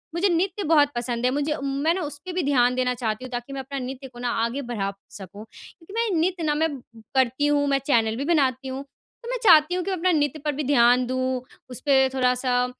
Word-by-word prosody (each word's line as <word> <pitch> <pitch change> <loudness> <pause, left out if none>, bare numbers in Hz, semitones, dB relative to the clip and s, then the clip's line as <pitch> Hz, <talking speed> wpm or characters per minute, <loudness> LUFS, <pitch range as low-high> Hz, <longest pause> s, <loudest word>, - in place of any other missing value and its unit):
मुझे 375 +4 +2
नृत्य 365 +3 0
बहुत 295 -2 +4
पसंद 240 0 -2
है, 250 - +3
मुझे 290 +2 -1
मैं 280 +4 0
ना 370 - -3
उस 290 -3 -5
पे 370 - -5
भी 360 -1 -1
ध्यान 250 -3 +3
देना 250 0 +1
चाहती 230 -1 -3
हूँ, - - -8
ताकि 245 +2 -5
मैं 275 - -4
अपना 275 +1 -6
नृत्य 265 +1 -6
को 245 -2 -14
ना 245 0 -2 0.2
आगे 245 +5 -3
बढ़ा 225 -6 -3 0.2
सकूँ, 200 +1 -10
क्योंकि 330 - -16
मैं 460 0 0
नृत्य 350 +1 0
ना, 300 -1 +1
मैं 320 +2 +1 0.5
करती 260 +2 +2
हूँ, 290 0 +2
मैं 275 -1 +2
चैनल 225 -5 +2
भी 275 - -3
बनाती 270 -5 +1
हूँ, 265 +1 -5
तो 460 - -16
मैं - - -1
चाहती 320 -4 +6
हूँ 365 - -1
कि 390 - -3
मैं 375 - -1
अपना 365 +2 +2
नृत्य 290 +1 -1
पर 300 - +1
भी 300 - -2
ध्यान 250 -2 +4
दूँ, 255 0 -1 0.3
उसपे 265 +1 +2
थोड़ा-सा 250 -1 +1
275 Hz, 235 wpm, -24 LUFS, 250-310 Hz, 0.5 s, चाहती